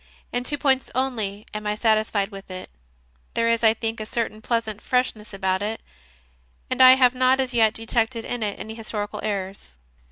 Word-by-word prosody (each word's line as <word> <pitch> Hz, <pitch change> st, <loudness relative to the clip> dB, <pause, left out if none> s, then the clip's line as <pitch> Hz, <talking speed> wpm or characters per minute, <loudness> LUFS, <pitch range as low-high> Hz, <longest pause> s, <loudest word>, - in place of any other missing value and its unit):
In 245 Hz, 0 st, -1 dB
two 290 Hz, +3 st, -2 dB
points 270 Hz, -2 st, +2 dB
only 220 Hz, -6 st, -2 dB
am 210 Hz, 0 st, -4 dB
I 210 Hz, -, 0 dB
satisfied 215 Hz, -2 st, +1 dB
with 195 Hz, -2 st, -11 dB
it: 185 Hz, 0 st, -8 dB, 0.6 s
there 230 Hz, 0 st, +2 dB
is, 230 Hz, 0 st, +2 dB
I 220 Hz, 0 st, +5 dB
think, 225 Hz, 0 st, -3 dB
a 215 Hz, -, -5 dB
certain 220 Hz, -2 st, -3 dB
pleasant 220 Hz, -2 st, -2 dB
freshness 250 Hz, -4 st, -1 dB
about 190 Hz, -1 st, -1 dB
it, 215 Hz, +2 st, -3 dB, 0.9 s
and -, -, +1 dB
I 255 Hz, 0 st, +10 dB
have 255 Hz, -2 st, +4 dB
not 255 Hz, +1 st, +3 dB
as 260 Hz, -1 st, 0 dB
yet 225 Hz, -2 st, +3 dB
detected 225 Hz, 0 st, 0 dB
in 245 Hz, -, -4 dB
it 205 Hz, -2 st, -3 dB
any 220 Hz, -, -6 dB
historical 215 Hz, -2 st, -5 dB
errors. 195 Hz, -, -4 dB
225 Hz, 185 wpm, -24 LUFS, 210-245 Hz, 0.9 s, I